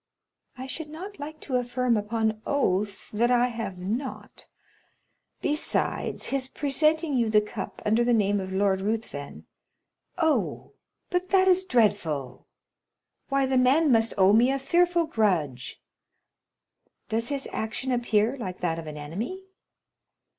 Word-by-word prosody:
"I 260 - -6
should 300 +3 -6
not 380 +6 -9
like 305 +2 -7
to 255 -3 -1
affirm 245 0 0
upon 220 +1 -1
oath 205 -8 -1
that 235 +3 +2
I 245 0 +3
have 225 -6 -5
not. 225 +9 -5 1.0
Besides, 300 +1 -1
his 270 -1 0
presenting 305 +3 +1
you 235 -3 +2
the 215 -1 +5
cup 210 - -6
under 220 +3 +3
the 245 - +2
name 205 -3 +2
of 190 0 -5
Lord 190 0 +1
Ruthven——" 205 -9 -4 0.7
"Oh, 320 -3 0 0.4
but 360 0 -1
that 380 -1 +4
is 375 0 +4
dreadful! 165 - 0 0.8
Why, 275 0 +2
the 260 -1 +2
man 275 +4 +4
must 225 -1 +3
owe 190 +1 +5
me 235 +4 +5
a 275 - +1
fearful 345 +4 +2
grudge." 175 - -1 1.3
"Does 230 +2 -1
his 280 -2 -3
action 220 +4 -3
appear 235 -1 +1
like 185 -5 -5
that 165 -2 -1
of 160 - -8
an 150 0 -7
enemy?" 205 - -5
235 Hz, 140 wpm, -26 LUFS, 205-280 Hz, 1.3 s, the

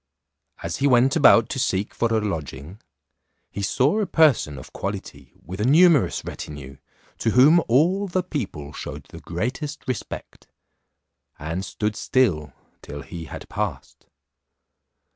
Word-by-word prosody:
As - - -3
he 140 - +2
went 130 +1 +4
about 120 -7 +6
to 135 - -3
seek 100 -5 -1
for 115 -1 0
a 110 - +3
lodging, 80 - -5 0.7
he 100 - -5
saw 130 - +2
a 210 - 0
person 150 - +3
of 65 - -12
quality 70 -2 -6
with 95 +4 -6
a - - +1
numerous 155 +3 +4
retinue, 70 -3 -8 0.4
to - - +1
whom 145 +9 +6
all 175 +11 +2
the 185 0 -1
people 100 - -5
shewed - - -7
the - - -10
greatest 130 - -4
respect, 130 -4 -6 0.9
and 80 +5 -4
stood 105 +2 -3
still 90 - +1 0.3
till 75 0 -8
he 85 -1 -8
had - - -9
passed. - - -5
115 Hz, 140 wpm, -23 LUFS, -, 0.9 s, about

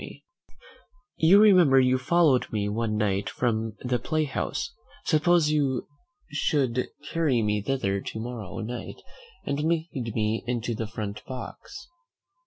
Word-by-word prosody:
Bickerstaff, - - -10 1.0
you 175 +5 +6
remember 180 -10 +6
you 130 0 +3
followed 150 -2 +3
me 105 -2 -1
one 105 +1 -1
night 100 -2 0
from 110 -2 -1
the 125 -1 0
play 155 -1 0
house; 155 - -3 0.3
suppose 160 -1 +3
you 140 -4 0 0.4
should 135 -4 0 0.2
carry 145 -9 +1
me 105 0 0
thither 100 -5 -1
to 110 - -6
morrow 115 -4 -6
night, 120 +3 -6 0.5
and 140 0 -1
lead 160 +2 -1 0.2
me 110 0 0
into 120 -1 -1
the 110 0 -4
front 105 -1 -6
box." 130 - -8
125 Hz, 135 wpm, -26 LUFS, 110-150 Hz, 1.0 s, you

